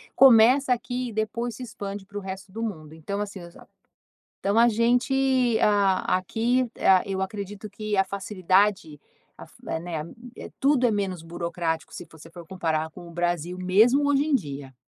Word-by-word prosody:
começa 255 +1 +6
aqui 245 +1 -4
e - - -10
depois 220 +2 -3
se 255 - -8
expande 200 -3 -7
para 205 +1 -9
o - - -4
resto 190 0 -8
do 225 +3 -6
mundo. 160 -9 -5
Então, 200 +6 -5
assim, 200 -2 -6
os 170 0 -13
a - - -15 0.8
então 200 +3 +1
a 235 +1 +6
gente, 245 +1 +2
ah, 200 -3 +2
aqui 235 +7 0
ah, 185 -1 +5
eu 195 -1 -3
acredito 200 +1 -5
que 210 +1 -5
a - - +6
facilidade, 190 -4 0 0.4
a - - -11
fa - - -10
eh, - - -1
né 165 -3 -4 0.6
tudo 270 -3 +3
é - - +2
menos 195 -4 -2
burocrático, 170 -1 -4
se 175 - -8
você 160 +1 -14
for 170 -1 -12
comparar 160 -4 -2
com 175 +1 -12
o - - -11
Brasil, 175 +1 -2
mesmo 225 +10 +3
hoje 285 0 +3
em 305 -2 0
dia. 140 - -3
200 Hz, 180 wpm, -25 LUFS, 175-230 Hz, 0.8 s, começa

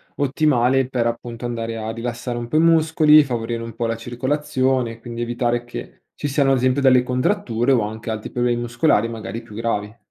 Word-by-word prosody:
ottimale, 135 -3 +2
per 125 -3 0
appunto 120 0 -5
andare 115 -1 -3
a 110 0 -4
rilassare 120 +1 -4
un 120 - -4
po' 135 - 0
i - - +5
muscoli, 160 -2 +5
favorire 120 -3 -3
un 115 0 -7
po' 120 - -2
la 115 0 -1
circolazione, 130 0 -1
quindi 120 0 -7
evitare 120 0 -1
che 120 - -9
ci - - -3
siano 140 -1 +2
ad 135 - +3
esempio 130 +2 +1
delle 130 -2 +5
contratture, 125 - 0
o 125 -4 +4
anche 110 +2 -5
altri 110 -1 -4
problemi 120 -1 0
muscolari 120 -1 +2
magari 115 0 -6
più 110 -3 -13
gravi. 110 -1 -3
120 Hz, 190 wpm, -21 LUFS, 115-135 Hz, -, i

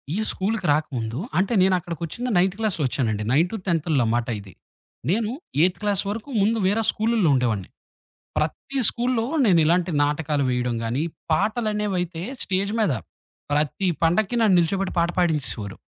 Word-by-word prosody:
ఈ - - -1
స్కూలుకి 195 -1 -2
రాకముందు 125 -6 -2 0.2
అంటే, 195 +5 +1
నేనక్కడికొచ్చింది 180 - -1
నైన్త్ 185 +2 +2
క్లాస్‌లో 210 -8 0
ఒచ్చానండి. 110 -5 -1
నైన్టు, 170 +9 +2
టెన్తుల్లో 160 -6 +1
మాట 120 -1 -1
ఇది. 95 -2 -14 0.6
నేను 215 +4 +1 0.3
ఎయిత్ 180 0 +2
క్లాస్ 205 -2 +1
వరుకు 220 +6 -5
ముందు 220 +3 +2
వేరే 210 +4 +2
స్కూలుల్లో 220 -5 +1
ఉండేవాడిని. 115 -7 -1 0.7
ప్రతి 270 - -3
స్కూల్లో 240 -1 0 0.2
నేనిలాంటి 175 -2 +3
నాటకాలు 145 -1 0
వేయడం 125 -1 0
గానీ, 120 +6 -1 0.3
పాటలనేవైతే 205 -3 -1 0.2
స్టేజ్ 195 +1 0
మీద 210 -9 +2 0.6
ప్రతి 150 +6 0 0.2
పండక్కి 190 +7 +2
నన్ను 210 -5 +5
నిలుచోబెట్టి 190 +3 0
పాట 170 +1 +2
పాడించేసేవారు. 150 - 0
175 Hz, 130 wpm, -23 LUFS, 150-210 Hz, 0.7 s, నన్ను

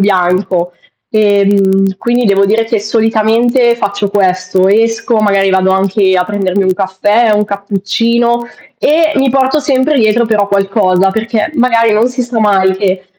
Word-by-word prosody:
bianco. 185 -2 0 0.4
Ehm, 200 -2 +1
quindi 240 +3 -1
devo 200 -2 +2
dire 220 +3 +1
che 225 -2 -2
solitamente 230 +2 +1
faccio 200 -2 -3
questo, 185 -1 0
esco, 225 +2 0
magari 200 -2 +1
vado 190 0 +1
anche 190 0 +1
a 180 - 0
prendermi 195 0 -2
un 185 0 0
caffè, 205 +4 0
un 210 0 +1
cappuccino 230 +4 -1 0.3
e 315 +1 +1
mi 270 -1 +1
porto 265 +3 +1
sempre 280 0 0
dietro 225 +1 +1
però 210 -2 0
qualcosa, 195 -1 +1
perché 220 +5 -2
magari 230 -3 +1
non 220 +3 +2
si 250 0 -4
sa 240 -1 -4
mai 190 -3 +1
che 190 -1 -2
205 Hz, 150 wpm, -11 LUFS, 195-235 Hz, 0.4 s, devo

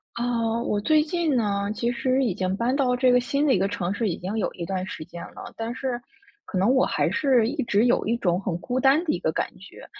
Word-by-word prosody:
啊， 235 -1 0
我 210 -3 -1
最 305 +8 +3
近 320 -2 0
呢， 200 -3 0
其 235 +3 0
实 260 +2 +1
已 225 - 0
经 185 0 -1
搬 235 +5 0
到 260 -3 +2
这 250 0 +3
个 250 - +5
新 280 +4 0
的 275 - +4
一 - - +2
个 195 - +2
城 185 -1 -2
市 225 +1 -1
已 175 - -1
经 195 +5 -4
有 220 - 0
一 170 - -6
段 185 0 -3
时 155 - -6
间 170 +2 -10
了， - - -10
但 230 +2 -4
是 255 -3 -3 0.4
可 190 - -4
能 200 +7 +3
我 260 - +4
还 - - 0
是 255 -6 +3
一 295 +2 -2
直 215 -1 +2
有 245 - +2
一 230 - +2
种 180 -5 +1
很 185 -3 -3
孤 250 +1 -2
单 275 +5 +4
的 325 - 0
一 - - -2
个 - - 0
感 - - 0
觉。 - - -13
235 Hz, 280 characters per minute, -25 LUFS, 200-260 Hz, 0.4 s, 个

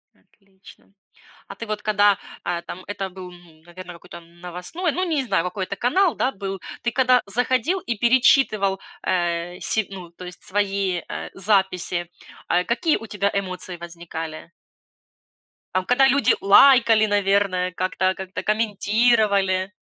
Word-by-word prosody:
Отлично. 195 0 -21 0.5
А - - -9
ты 230 - -7
вот, 215 0 -3
когда, 205 -2 +3 0.3
а, 175 -1 -2
там 180 +1 -9
это 195 -1 -4
был, 185 -1 -10
н 175 -3 -18
наверное, 175 +1 -11
какой-то 170 0 -12
новостной, 180 - -5
ну, 365 - -2
не 310 -5 0
знаю, 225 -9 0
какой-то 190 +2 -4
канал, 340 - +2
да, 260 - 0
был. 195 -3 -6 0.2
Ты, 235 - -1
когда 255 -1 +3
заходил 255 - 0
и 235 - -4
перечитывал, 235 -5 +3 0.2
э, 175 0 -1
се 220 -2 0
ну, 185 -3 -9
то 175 +2 -12
есть, 180 0 -11
свои, 195 -2 -1
э, - - -6
записи, 190 -3 0 0.4
а 180 +1 +2
какие 305 +7 +1
у 225 - -10
тебя 200 -1 -1
эмоции 185 -2 -4
возникали? 165 -2 -8 1.2
Там, 185 0 0
когда 265 +2 +4
люди 275 +2 +3
лайкали, 225 +1 +6
наверное, 200 -3 +1
как-то 185 +1 0
как-то 190 0 -6
комментировали? 210 -3 +1
195 Hz, 140 wpm, -22 LUFS, 180-225 Hz, 1.2 s, лайкали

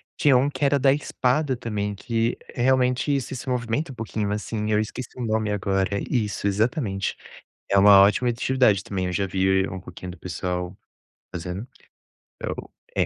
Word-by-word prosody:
Tinha 140 -4 +4
um 135 +3 +2
que 145 - -4
era 140 0 +4
da 135 0 +4
espada 140 -1 0
também, 105 -3 -3
que 115 +3 -1 0.2
é - - -3
realmente 130 +2 +2
isso, 135 0 -3
se 130 - -6
movimenta 125 +4 -1
um - - -10
pouquinho 110 -2 -3
assim, 105 +1 -2
eu 105 - +3
esqueci 115 +3 -4
o 125 - -3
nome 110 -1 0
agora. 100 0 0
Isso, 105 -5 -1
exatamente. 100 0 0 0.5
É 100 - +4
uma 100 0 +8
ótima 105 +5 +3
atividade 120 -4 +2
também, 95 -2 -3
eu 90 - -2
já 100 +2 0
vi 95 +1 +2
um 95 - -5
pouquinho 90 0 -9
do 90 - -10
pessoal 90 +1 -4 0.6
fazendo. 90 +4 -5 1.3
É, - - +3
110 Hz, 170 wpm, -24 LUFS, 95-125 Hz, 1.3 s, uma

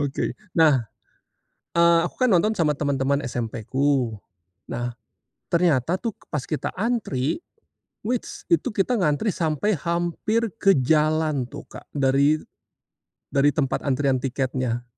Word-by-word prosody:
Oke, 140 -1 -1 0.2
nah, 145 -8 +4 0.8
eee, 170 0 +5
aku 175 - -4
kan 255 - +4
nonton 200 +2 +3
sama 155 -8 +1
teman-teman 140 0 0
SMP-ku, 120 0 -1 0.5
nah, 120 +1 -3 0.5
ternyata 165 -2 +2
tuh 225 +5 -2 0.2
pas 150 -4 -3
kita 155 - -3
antri, 200 - -1 0.6
wits, 240 +3 -4
itu 330 -8 +2
kita 215 +4 +1
ngantri 175 +1 +1
sampai 170 +3 0
hampir 175 +8 -1
ke 195 -2 +4
jalan 155 0 +2
tuh, 120 - -10
Kak, - - -11
dari 140 +2 +3 0.9
dari 140 0 +3
tempat 135 -4 0
antrian 135 -1 +2
tiketnya. 130 -2 -2
150 Hz, 120 wpm, -24 LUFS, 135-175 Hz, 0.9 s, eee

